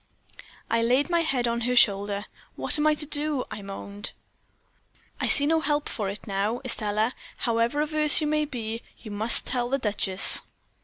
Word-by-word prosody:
"I 230 - 0
laid 255 +8 +1
my 340 - +2
head 275 -7 0
on 235 0 -2
her 250 +2 0
shoulder. 205 -2 +2 0.3
"'What - - +2
am 300 - +2
I 305 - +3
to 300 - -3
do?' 295 -2 -1
I 210 - -7
moaned. 200 +1 -8 1.1
"'I - - -1
see 285 - +7
no 320 +2 +2
help 295 -1 0
for 205 -4 -4
it 200 - -8
now, 205 +4 -2
Estelle; 215 -1 -1 0.3
however 235 +4 0
averse 305 0 +3
you 310 - -2
may 305 0 0
be, 230 -4 -6 0.2
you 215 - -11
must 215 +3 +2
tell 245 -1 -1
the 275 - 0
duchess.' 205 -5 +3
240 Hz, 175 wpm, -25 LUFS, 210-295 Hz, 1.1 s, see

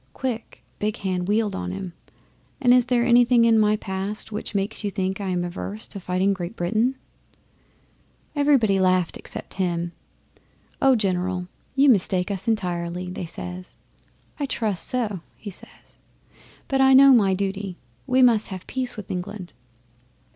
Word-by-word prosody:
Quick 240 -4 -5 0.2
Big 210 +2 -1
Hand 185 -2 -2
wheeled 210 0 +1
on 90 0 -4
him, 170 - -6 0.7
"And 245 -3 +5
is 250 -1 +4
there 240 -1 +2
anything 240 -1 +5
in 225 -1 +5
my 210 0 +4
past 200 +1 -4
which 210 0 -5
makes 200 +3 -2
you 205 - 0
think 190 0 -2
I 195 - -3
am 180 -1 0
averse 190 +4 -4
to 200 - -5
fighting 185 +2 +1
Great 180 +2 -6
Britain?" 220 +8 0 1.4
'Everybody 270 -9 +3
laughed 185 -2 +2
except - - -7
him. 170 -1 -1 0.9
"Oh, 270 -1 +5
General, 185 -3 -1 0.3
you 280 +1 +5
mistake 190 -5 +3
us 195 +3 -3
entirely!" 180 -4 -2
they 180 -1 -5
says. 180 +2 -7 0.6
"I 285 - -1
trust 210 -8 -1
so," 220 -7 0 0.2
he 205 - -8
says. - - -10 0.7
"But 270 -1 +1
I 265 0 +6
know 275 0 +9
my 200 -6 +4
duty. 195 -1 -3 0.3
We 255 0 +4
must 230 -4 +4
have 185 -2 -7
peace 255 -2 -4
with 210 - -7
England." 185 0 -6
200 Hz, 155 wpm, -24 LUFS, 185-235 Hz, 1.4 s, know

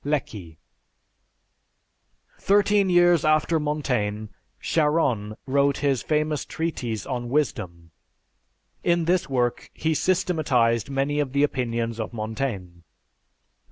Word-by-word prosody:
(Lecky.) 105 - -3 1.8
Thirteen 200 0 +3
years 175 -2 +4
after 155 +1 +2
Montaigne, 125 -9 -2 0.3
Charron 140 -10 0
wrote 140 +1 +2
his 135 -4 +2
famous 150 -1 0
treatise 125 -10 -4
on 120 -3 -4
Wisdom. 95 - -2 0.9
In 170 -1 +2
this 175 -2 +1
work 125 -2 -1
he 160 +1 0
systematized 150 - +1
many 140 +2 -1
of 140 -3 -2
the 140 +1 +2
opinions 115 -4 -1
of 110 +1 -4
Montaigne. 110 -6 -4
140 Hz, 100 wpm, -24 LUFS, 115-155 Hz, 1.8 s, years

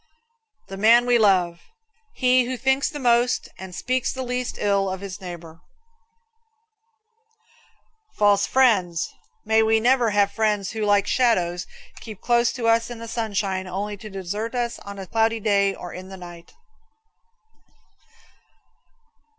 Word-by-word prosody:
The 195 - -8
Man 230 +4 +5
We 245 -1 +3
Love. 180 -5 +2 0.5
He 255 - +3
who 255 +1 -4
thinks 265 +2 +1
the 295 - -7
most 245 -2 +1
and 185 -1 -9
speaks 255 0 -1
the 260 - -5
least 250 0 -3
ill 200 -1 +1
of 190 0 -4
his 200 0 -8
neighbor. 170 -2 -9 2.6
False 205 -1 +3
Friends. 200 -11 +2 0.3
May 220 +1 +3
we 220 0 +3
never 245 0 +3
have 205 -1 +2
friends 210 -4 0
who, 220 - -5
like 205 -1 +3
shadows, 180 -8 +1 0.3
keep 215 -4 -10
close 240 0 +2
to 235 -3 -3
us 230 +1 +2
in 240 - -7
the 230 0 -8
sunshine 200 -5 -2
only 200 +3 -4
to 215 +2 -10
desert 205 +5 -5
us 240 -1 -2
on 200 0 -10
a 195 - -7
cloudy 225 +3 +1
day 200 -2 +1
or 175 - -9
in 185 +1 -9
the 190 - -9
night. 175 -2 -12
210 Hz, 140 wpm, -23 LUFS, 190-235 Hz, 2.6 s, Man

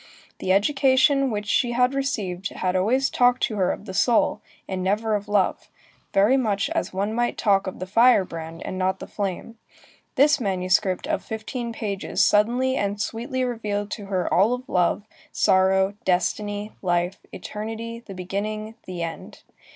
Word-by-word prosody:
The 185 - -1
education 270 +5 +3
which 210 -2 -3
she 240 +3 +1
had 250 +2 +2
received 205 -10 -2
had 185 0 -2
always 245 +9 +2
talked 245 0 +3
to 215 - 0
her 185 -2 +2
of - - -6
the 190 - -7
soul, 235 +4 +2 0.3
and 190 -1 -3
never 215 +3 0
of 205 0 -2
love, 205 0 0 0.4
very 210 +7 +4
much 205 -6 0
as - - -1
one 200 +3 -2
might 240 +1 0
talk 200 -2 +2
of 190 - -5
the 185 - -5
firebrand 185 -7 +2
and 185 - -4
not 185 0 +1
of - - -31
the - - -8
flame. 205 +3 -5 0.6
This 295 +3 +4
manuscript 185 0 +1
of 310 +1 -2
fifteen 235 +2 -5
pages 205 -4 -1
suddenly 245 +5 +2
and 200 -3 -1
sweetly 245 +5 -2
revealed 210 -4 -3
to 205 -3 -6
her 185 -2 -1
all 200 +7 +4
of 250 +1 -11
love, 180 +3 +1 0.3
sorrow, 190 +1 +3
destiny, 205 +3 -1
life, 175 +1 0
eternity, 225 +2 -6
the 195 - -10
beginning, 210 +4 -4
the 180 -2 -4
end. 165 -1 -7
205 Hz, 165 wpm, -24 LUFS, 190-240 Hz, 0.6 s, very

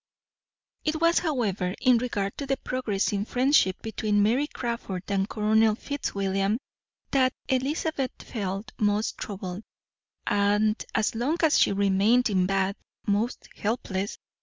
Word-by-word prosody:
It 310 0 0
was, 335 +1 +4
however, 210 - -1
in 250 -2 +4
regard 205 -5 -2
to 280 - -4
the 270 0 +1
progressing 210 -6 -1
friendship 250 -5 +3
between 210 -1 +1
Mary 250 +8 +2
Crawford 235 -9 -4
and 195 0 0
Colonel 215 0 +3
Fitzwilliam 200 -6 -1 0.5
that 260 -2 +3
Elizabeth 270 +1 0
felt 200 +1 -4
most 210 0 +1
troubled, 190 -2 -5 0.6
and 210 +2 +2
as 220 -1 +2
long 250 +9 0
as 310 -2 +5
she - - +4
remained 200 +5 +3
in 185 -2 +2
Bath, 195 0 0 0.3
most 210 +4 -1
helpless. 200 -3 -2
215 Hz, 125 wpm, -27 LUFS, 200-255 Hz, 0.6 s, as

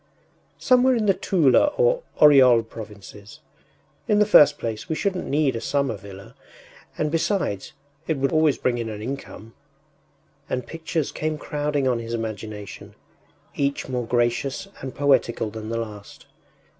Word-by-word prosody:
“Somewhere 255 0 +3
in 225 -2 0
the 195 - +4
Tula 165 - +3
or - - +3 0.2
Oryol 130 -6 +7
provinces.... 105 -1 -11 0.7
In 210 - +3
the 210 - +5
first 150 -7 +6
place 110 -2 -5
we 160 - -1
shouldn’t 185 +1 -2
need 145 -3 +1
a 115 - -4
summer 140 -5 -1
villa, 100 +3 -12 0.6
and 150 -1 -1
besides, 165 - -1 0.3
it 160 - 0
would 135 0 0
always 155 -2 +3
bring 120 -1 -1
in 115 -1 -3
an 105 -1 -7
income.” 115 -3 -7 1.0
And 125 -1 -2
pictures 160 -2 -3
came 155 0 -3
crowding 145 -2 -2
on 125 -2 +1
his 115 0 -4
imagination, 110 -2 -7 0.6
each 140 -1 -2
more 125 -2 -3
gracious 120 +7 -1
and 130 -1 -7
poetical 135 -6 +1
than 110 0 -7
the 115 - -2
last. 105 -3 -8
130 Hz, 145 wpm, -23 LUFS, 115-155 Hz, 1.0 s, Oryol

